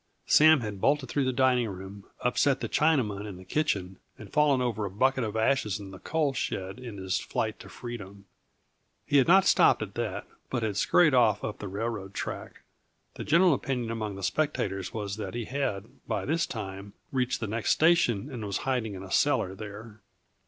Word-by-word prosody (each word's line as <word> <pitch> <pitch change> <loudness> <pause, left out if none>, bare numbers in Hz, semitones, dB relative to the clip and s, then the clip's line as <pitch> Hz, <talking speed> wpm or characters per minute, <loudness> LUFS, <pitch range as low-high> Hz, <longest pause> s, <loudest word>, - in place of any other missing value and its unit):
Sam 155 -2 +6
had 105 -4 -5
bolted 140 -3 +2
through 140 -2 0
the 130 - +1
dining 125 -2 +2
room, 95 +1 -9
upset 135 +2 +2
the - - -3
Chinaman 115 -10 +1
in 100 -3 -8
the 95 - -13
kitchen, 95 - -1 0.2
and - - -12
fallen 150 -3 +4
over 120 -4 -1
a 100 - -2
bucket 130 +6 +1
of 110 -1 -3
ashes 110 -4 +1
in 100 -1 -9
the 95 - -10
coal 155 -3 0
shed 95 -3 -3
in 120 -5 -8
his 95 -1 -1
flight - - -3
for - - -12
freedom. 100 -5 -8 0.8
He 145 - +3
had 135 - +4
not 190 +2 +6
stopped - - +5
at - - -8
that, - - -3 0.2
but 120 -3 -2
had 105 -2 -1
scurried 150 - +4
off 110 -5 +3
up 105 - -4
the 105 - -5
railroad 100 -1 -4
track. - - -6 0.5
The - - -6
general 170 +2 +5
opinion 125 -4 -2
among 110 -3 -3
the 100 - -8
spectators 95 -5 -1
was 105 -2 -4
that 110 - -5
he 120 -2 -3
had, 115 -7 -2 0.2
by - - -2
this 165 +3 0
time, 100 -3 -7 0.2
reached 130 -1 0
the 115 - -2
next 110 +2 -2
station 155 - +3
and 120 -4 -6
was 100 -2 -2
hiding 120 -6 -1
in 95 - -8
a 95 - -10
cellar 95 - +2
there. 105 +2 -9
115 Hz, 195 wpm, -28 LUFS, 100-135 Hz, 0.8 s, Sam